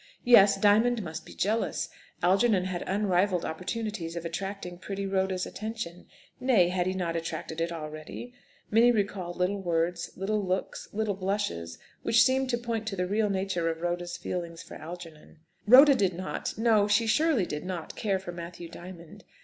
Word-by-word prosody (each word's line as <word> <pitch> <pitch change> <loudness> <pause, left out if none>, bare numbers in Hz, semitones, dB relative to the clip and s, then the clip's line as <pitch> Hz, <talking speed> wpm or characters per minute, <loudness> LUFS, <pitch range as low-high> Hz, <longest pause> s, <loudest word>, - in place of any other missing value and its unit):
Yes, 200 -5 +7
Diamond 220 +3 +4
must 160 -2 -7
be - - -11
jealous. 220 +4 0 0.4
Algernon 195 +2 +4
had 185 -2 -3
unrivalled 190 -2 +1
opportunities 185 0 -4
of 170 0 -5
attracting 180 +1 -5
pretty 195 +1 -4
Rhoda's 190 -1 0
attention. 215 -5 -6 0.3
Nay, 240 -9 +4
had 180 0 0
he 185 - 0
not 170 -3 -2
attracted 165 0 -4
it 170 +1 -1
already? 155 +9 -7 0.4
Minnie 230 +3 +6
recalled 195 -5 -2
little 190 +2 0
words, 170 0 -1
little 205 +2 -1
looks, 185 0 -3
little 215 0 -1
blushes, 185 - -2 0.2
which 230 - +5
seemed 265 0 +2
to 240 - +1
point 230 -2 -3
to 205 - -2
the 180 -1 -1
real 210 +3 +1
nature 190 -3 0
of 165 0 -4
Rhoda's 175 0 -2
feelings 170 -2 -5
for - - -12
Algernon. 165 -2 -10 0.3
Rhoda 275 +5 +9
did 195 -8 +1
not 185 +2 -4
no; 220 -2 +4
she 210 +2 +3
surely 260 - +3
did 150 -2 -5
not 180 -3 -5
care 200 -3 0
for 185 -2 -7
Matthew 170 0 -8
Diamond. 170 -1 -11
190 Hz, 165 wpm, -28 LUFS, 175-215 Hz, 0.4 s, Rhoda